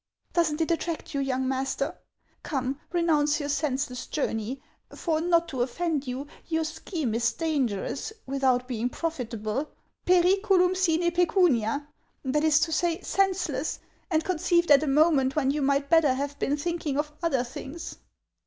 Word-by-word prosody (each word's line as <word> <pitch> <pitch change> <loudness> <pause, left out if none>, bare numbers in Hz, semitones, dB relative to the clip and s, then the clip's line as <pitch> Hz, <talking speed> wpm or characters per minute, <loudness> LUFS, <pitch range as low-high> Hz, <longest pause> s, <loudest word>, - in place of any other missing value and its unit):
Does 335 -3 +3
n't 300 +2 -3
it 325 - +1
attract 335 -1 -2
you, 280 - -1
young 260 -1 -1
master? 265 0 -1 0.5
Come, 270 -1 -2
renounce 315 -3 +2
your 290 -1 -3
senseless 275 -3 -1
journey; 250 -3 -2 0.3
for, 320 -2 -1
not 340 0 +2
to 260 -5 -3
offend 290 +3 -1
you, 255 +3 -4 0.2
your 320 -1 0
scheme 310 - -3
is 235 +1 +2
dangerous, 270 - -1
without 260 -2 +1
being 245 -1 -1
profitable, 250 -4 -3 0.2
— - - -49
pcriculurn 365 +1 +4
sine 345 -2 +2
pccunia; 315 - +2 0.4
that 295 +3 +1
is 310 -2 +5
to 330 0 +1
say, 335 +2 +1
senseless, 385 -1 0 0.3
and 320 -3 +1
conceived 345 -2 +1
at 285 -1 +8
a 310 - -2
moment 275 -2 +3
when 275 -3 +2
you 295 +1 -1
might 280 0 +1
better 300 -4 +4
have 285 +1 -4
been 290 - 0
thinking 315 -2 -2
of 300 0 -2
other 275 -8 +1
things." 270 +6 -8
295 Hz, 155 wpm, -27 LUFS, 265-335 Hz, 0.5 s, at